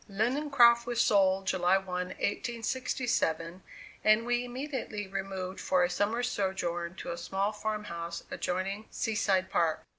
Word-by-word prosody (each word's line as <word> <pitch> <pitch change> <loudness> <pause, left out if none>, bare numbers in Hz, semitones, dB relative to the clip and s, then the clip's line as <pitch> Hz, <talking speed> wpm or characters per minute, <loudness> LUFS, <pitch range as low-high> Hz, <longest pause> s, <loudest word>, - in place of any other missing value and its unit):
Lindencroft 235 +2 +4
was 240 -1 -1
sold 195 -3 +4
July 185 0 +3
1, 190 - -6
1867, 190 -1 -1 0.4
and 215 +2 +4
we 245 0 +1
immediately 245 -4 -4
removed 190 -1 -4
for 185 -1 +2
a 175 - +1
summer's 225 +6 0
sojourn 180 -5 -2
to 170 - -6
a 170 - -4
small 195 +4 -1
farm 215 0 -3
house 170 -3 -5
adjoining 195 +4 -2
Sea 225 - -2
side 190 -3 +1
Park. 165 -2 +1
195 Hz, 140 wpm, -30 LUFS, 185-235 Hz, 0.4 s, Lindencroft